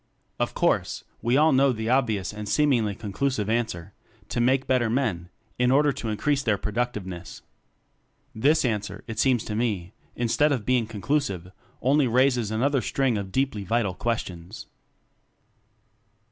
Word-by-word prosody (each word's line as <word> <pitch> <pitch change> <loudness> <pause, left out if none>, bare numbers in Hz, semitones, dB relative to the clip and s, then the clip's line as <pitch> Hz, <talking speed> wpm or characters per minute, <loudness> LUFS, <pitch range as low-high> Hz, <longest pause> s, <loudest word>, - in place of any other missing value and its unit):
Of - - -1
course, - - 0 0.2
we 120 +3 +2
all 155 +2 +5
know 135 0 +4
the 110 -1 -3
obvious 115 -7 +1
and 105 -1 -6
seemingly 120 -9 +2
conclusive 110 +1 -2
answer: 100 -6 -2 0.4
To 120 - -1
make 130 +2 +2
better 125 -3 +2
men 110 -9 -1 0.3
in 125 0 +3
order 145 +3 +4
to 115 - -5
increase 140 +6 0
their 110 -6 +1
productiveness. 105 -6 -4 0.9
This 145 +7 +3
answer, 105 -3 -2
it 115 -1 -6
seems 125 -3 +3
to 105 - -5
me, 105 -5 -2 0.2
in 120 - -1
stead 145 +6 +3
of 125 -7 -1
being 125 -3 +2
conclusive, 100 - -2 0.3
only 140 +1 +3
raises 125 -2 +2
another 130 +5 +1
string 135 -2 0
of 100 -2 -4
deeply 130 -5 -1
vital 110 -1 0
ques 115 +4 -1
tions. 95 +5 -10
115 Hz, 150 wpm, -25 LUFS, 105-130 Hz, 0.9 s, all